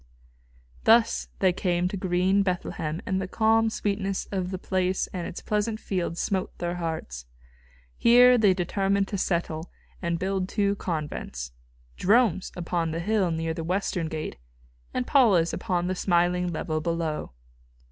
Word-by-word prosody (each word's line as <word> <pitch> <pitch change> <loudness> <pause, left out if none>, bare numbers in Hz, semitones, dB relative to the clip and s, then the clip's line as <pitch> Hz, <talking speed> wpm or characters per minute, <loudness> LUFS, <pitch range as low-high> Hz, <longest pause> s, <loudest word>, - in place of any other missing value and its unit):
Thus 230 0 +4
they 185 -2 +4
came 175 -1 0
to 200 - -4
green 185 +1 +2
Bethlehem, 175 -4 -2
and 190 -1 -1
the 190 - -3
calm 225 +2 +3
sweetness 195 -2 -2
of 185 -2 -2
the 185 - -3
place 185 0 0
and 180 -3 -3
its - - -8
pleasant 215 +1 -1
fields 175 -5 -3
smote 190 -2 -2
their 175 0 -3
hearts. 160 - -5 0.7
Here 245 +1 +7
they 200 -4 +4
determined 195 +2 0
to 200 - -2
settle 170 -2 -1 0.3
and 170 -2 -1
build 190 +1 -1
two 200 -2 +1
convents 150 - -4 0.5
Jerome's 200 -3 +3
upon 170 -1 -1
the 165 +1 -3
hill 200 0 +1
near 165 0 -1
the 165 0 -5
western 180 -1 -1
gate 155 - -5 0.5
and 125 - -2
Paula's 200 -11 +4
upon 175 -1 -1
the 185 - 0
smiling 180 -1 +1
level 155 -1 -2
below. 165 - -2
180 Hz, 145 wpm, -26 LUFS, 170-200 Hz, 0.7 s, Here